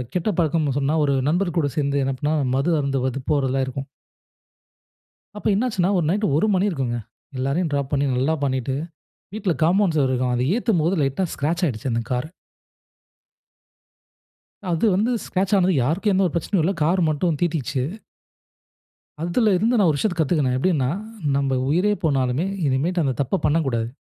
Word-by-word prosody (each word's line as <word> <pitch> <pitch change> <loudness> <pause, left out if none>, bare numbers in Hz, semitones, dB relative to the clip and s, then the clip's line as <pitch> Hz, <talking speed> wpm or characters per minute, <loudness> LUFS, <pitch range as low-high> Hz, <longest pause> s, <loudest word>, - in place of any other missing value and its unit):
கெட்ட 180 +4 +1
பழக்கம்னு 155 -4 +1
சொன்னா 145 +3 0
ஒரு 140 -1 +1
நண்பர் 175 +1 0
கூட 145 -3 +1
சேந்து, 140 -1 +1
என்ன 135 0 -1
பண்ணா 150 +1 0 0.2
மது 145 +6 +1
அருந்துவது 135 -1 -1
போறதுலாம் 135 -2 +1
இருக்கும். 135 +1 -5 1.5
அப்ப 210 - -8
என்னாச்சுனா, 210 -4 +1
ஒரு 170 - +1
நைட் 205 +4 0
1 165 - +2
மணி 190 +2 +2
இருக்குங்க. 130 -8 -2 0.4
எல்லரையும் 140 +6 -1
ட்ராப் 140 -1 -2
பண்ணி, 140 0 +2
நல்லா 135 +5 +1
பண்ணிட்டு, 130 -1 -1 0.6
வீட்ல 210 -4 -1
காம்பவுண்ட் 180 +1 +3
சொவுரு 135 -3 +2
இருக்கும். 125 -1 0
அத 120 - 0
ஏத்தும்போது, 195 -7 +1
லைட்டா 135 +6 0
ஸ்கிராச் 165 +6 -1
ஆயிடுச்சு 130 -2 -3
அந்த 115 0 0
காரு. 125 +4 -1 2.4
அது 170 +5 +1
வந்து 215 +5 +1
ஸ்கிராச் 195 +2 0
ஆனது, 185 0 +3
யாருக்கும் 185 - +1
எந்த 190 0 +3
ஒரு 175 - -4
பிரச்சனையும் 170 +2 0
இல்ல. 190 +4 +1
கார் 180 +4 +2
மட்டும் 155 0 0
தீட்டிச்சு. 155 -6 -1 1.4
அதுல 210 +6 +2
இருந்து 225 +7 +1
நான் 195 -5 +4
ஒரு 150 - 0
விஷயத்தை 195 -1 -1
கத்துக்குனேன். 145 -5 +1
எப்பிடீன்னா, 140 -3 +1 0.5
நம்ம 135 -2 0
உயிரே 180 +8 +2
போனாலுமே 135 +1 +1 0.2
இனிமேட்டு 160 +7 +1
அந்த 135 -2 0
தப்ப 160 +9 -1
பண்ணக்கூடாது. 140 -7 +1
155 Hz, 155 wpm, -22 LUFS, 135-180 Hz, 2.4 s, நான்